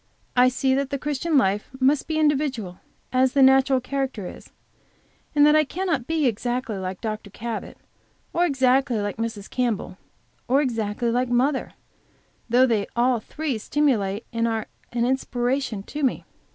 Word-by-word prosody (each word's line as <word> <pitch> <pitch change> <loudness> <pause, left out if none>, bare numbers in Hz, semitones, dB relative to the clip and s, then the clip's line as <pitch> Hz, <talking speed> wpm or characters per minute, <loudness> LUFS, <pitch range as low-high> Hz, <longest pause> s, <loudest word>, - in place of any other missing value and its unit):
I 250 0 +6
see 260 +1 +1
that 275 0 0
the 280 - -2
Christian 295 +2 0
life 200 -3 +1
must 270 +2 +2
be 315 -1 -1
individual, 275 -11 0 0.3
as 255 0 +3
the 275 - +5
natural 265 0 +5
character 265 -5 -3
is - - -10 0.9
and 290 0 +6
that 300 +1 +6
I 310 - +5
cannot 320 -5 -2
be 320 -2 +1
exactly 240 -1 -1
like 185 0 -5
Dr. 215 -2 -4
Cabot, 225 +2 -6 0.6
or 345 - +2
exactly 265 -3 +2
like 205 +1 -3
Mrs. 225 -3 -4
Campbell, 235 -6 -2 0.5
or 260 +3 +3
exactly 230 -3 -1
like 250 +1 0
mother, 260 +3 +1 0.8
though 250 +3 +5
they 220 -5 0
all 245 0 +2
three 275 +1 -4
stimulate 220 -6 0
and 230 0 +1
are 225 -1 -1 0.3
an 235 0 0
inspiration 250 -3 -1
to 295 +8 -6
me. 265 -3 0
255 Hz, 155 wpm, -24 LUFS, 225-275 Hz, 0.9 s, I